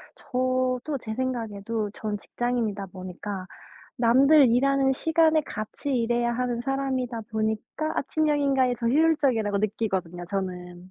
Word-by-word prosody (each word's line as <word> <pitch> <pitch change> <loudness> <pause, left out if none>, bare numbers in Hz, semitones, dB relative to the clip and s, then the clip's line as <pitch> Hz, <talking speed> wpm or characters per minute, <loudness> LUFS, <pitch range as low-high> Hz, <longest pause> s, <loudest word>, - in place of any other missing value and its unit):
저도 255 +2 -1
제 220 -2 -5
생각에도 225 -4 -2
전 210 0 -4
직장인이다 220 -3 -2
보니까 185 +1 -6 0.5
남들 270 +5 +6
일하는 270 +2 +3
시간에 320 +2 +3
같이 215 +5 -4
일해야 240 0 +1
하는 240 -1 -1
사람이다 260 -2 -2
보니까 220 +8 -2
아침형 300 +1 +1
인간이 265 -3 +2
더 235 - -3
효율적이라고 260 -8 +2
느끼거든요 190 -5 -2
저는. 180 -2 -5
240 Hz, 320 characters per minute, -26 LUFS, 210-270 Hz, 0.5 s, 남들